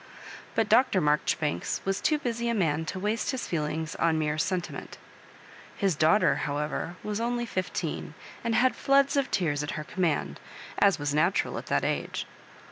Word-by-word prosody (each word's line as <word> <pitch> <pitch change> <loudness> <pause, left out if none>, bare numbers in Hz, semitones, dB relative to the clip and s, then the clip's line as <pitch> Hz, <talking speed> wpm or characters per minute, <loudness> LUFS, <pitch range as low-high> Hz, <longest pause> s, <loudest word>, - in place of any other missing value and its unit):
But 225 -2 +2
Dr. 225 -3 +4
Maijoribanks 150 -1 0
was 195 +1 0
too 305 - +2
busy 235 -3 -2
a 235 - +1
man 160 -5 +1
to 185 - -4
waste 210 +4 -1
his 260 -2 -2
feelings 160 -1 -2
on 165 - +3
a - - +1
mere 155 0 0
sen 185 +3 +1
timent 175 - -8 0.8
His 195 -4 +1
daughter, 160 +8 +4
however, 150 +3 -2
was 210 +1 -2
only 240 0 -1
fif 185 -5 -3
teen, - - -4 0.3
and 230 -1 0
had 255 +3 +3
floods 275 +1 +3
of 275 -2 +1
tears 150 -6 0
at 150 - -4
her 150 - -3
command, 150 - -1 0.4
as 200 -1 +5
was 145 -1 -2
natural 170 +6 +1
at - - -11
that - - +1
age. - - -2
185 Hz, 180 wpm, -28 LUFS, 150-230 Hz, 0.8 s, as